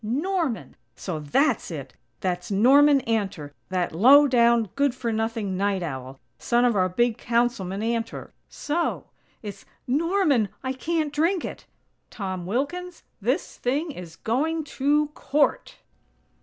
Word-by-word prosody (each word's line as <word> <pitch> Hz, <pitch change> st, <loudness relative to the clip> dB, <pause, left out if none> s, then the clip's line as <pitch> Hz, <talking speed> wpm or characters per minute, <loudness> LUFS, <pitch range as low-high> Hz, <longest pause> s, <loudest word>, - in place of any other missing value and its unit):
Norman!_ 275 Hz, -, -2 dB, 0.2 s
So 165 Hz, +3 st, -5 dB
that's 235 Hz, -, +1 dB
it! 140 Hz, -6 st, -7 dB, 0.3 s
That's 180 Hz, -1 st, -2 dB
Norman 275 Hz, +7 st, +5 dB
Antor, 200 Hz, -, -2 dB, 0.2 s
that 180 Hz, -3 st, -1 dB
low 270 Hz, -, +7 dB
down, 235 Hz, -5 st, +3 dB
good 280 Hz, -2 st, +1 dB
for 235 Hz, -2 st, -2 dB
nothing 220 Hz, -3 st, -2 dB
night 195 Hz, -1 st, 0 dB
owl! 135 Hz, -3 st, -6 dB, 0.2 s
Son 240 Hz, +1 st, +2 dB
of 240 Hz, -3 st, +2 dB
our 185 Hz, -1 st, +2 dB
big 240 Hz, +4 st, +1 dB
Councilman 230 Hz, -5 st, 0 dB
Antor. 230 Hz, 0 st, -3 dB, 0.2 s
So!! 330 Hz, +3 st, -3 dB, 0.3 s
It's 200 Hz, -2 st, -8 dB, 0.2 s
'Norman! 295 Hz, -, +2 dB
I 260 Hz, 0 st, -2 dB
can't 310 Hz, +2 st, -2 dB
drink 335 Hz, +5 st, +1 dB
it'! -, -, -8 dB, 0.4 s
Tom 185 Hz, -4 st, -5 dB
Wilkins, 335 Hz, -, -3 dB, 0.2 s
this 255 Hz, -, -1 dB
thing 290 Hz, +6 st, -1 dB
is 175 Hz, -, -10 dB
going 310 Hz, -, -1 dB
to 295 Hz, +1 st, +1 dB
_court!! 295 Hz, 0 st, 0 dB
235 Hz, 130 wpm, -25 LUFS, 195-290 Hz, 0.4 s, low